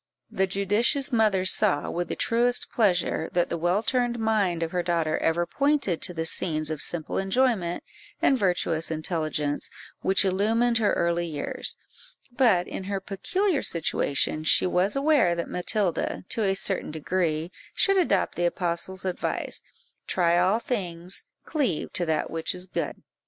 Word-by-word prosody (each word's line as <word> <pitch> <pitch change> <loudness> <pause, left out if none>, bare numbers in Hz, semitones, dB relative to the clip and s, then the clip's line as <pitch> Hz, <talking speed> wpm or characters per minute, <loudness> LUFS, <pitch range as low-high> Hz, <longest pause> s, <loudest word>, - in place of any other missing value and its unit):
The 190 0 +1
judicious 210 +9 +1
mother 215 -5 +2
saw, 145 -5 +2
with 175 0 -2
the - - -2
truest 240 +1 +1
pleasure, 180 -6 +1
that 175 -1 +1
the 170 - -2
well 175 +6 +1
turned 245 -1 0
mind 205 -7 +1
of 165 - -3
her 180 - 0
daughter 170 -2 0
ever 170 +1 +1
pointed 280 - +1
to 210 - +3
the 160 0 -2
scenes 155 -2 +1
of 155 -2 -3
simple 160 +2 0
enjoyment 195 -4 +1 0.4
and 270 - +4
virtuous 175 -6 0
intelligence 155 -2 -1 0.3
which 195 +1 +2
illumined 225 +5 +2
her 215 - +2
early 170 0 0
years; 150 -3 -4 0.6
but, 220 -9 +3
in 190 - -6
her 200 0 -2
peculiar 305 - -1
situation, 155 -2 0
she 155 - +5
was 185 +3 +1
aware 275 - +3
that 170 - -3
Matilda, 180 0 -1
to 225 - -1
a 195 -2 +2
certain 195 -1 -1
degree, 160 +1 -1 0.2
should 390 -1 +4
adopt 360 - +1
the 175 - -1
apostle's 180 +2 -3
advice 185 -1 -3 0.5
"Try 170 -2 +2
all 185 +4 +3
things, 180 -7 -3 0.2
cleave 270 - -1
to 175 - 0
that 155 -1 -1
which 165 +2 -2
is 180 0 -2
good." 185 - -4
185 Hz, 155 wpm, -26 LUFS, 170-220 Hz, 0.6 s, she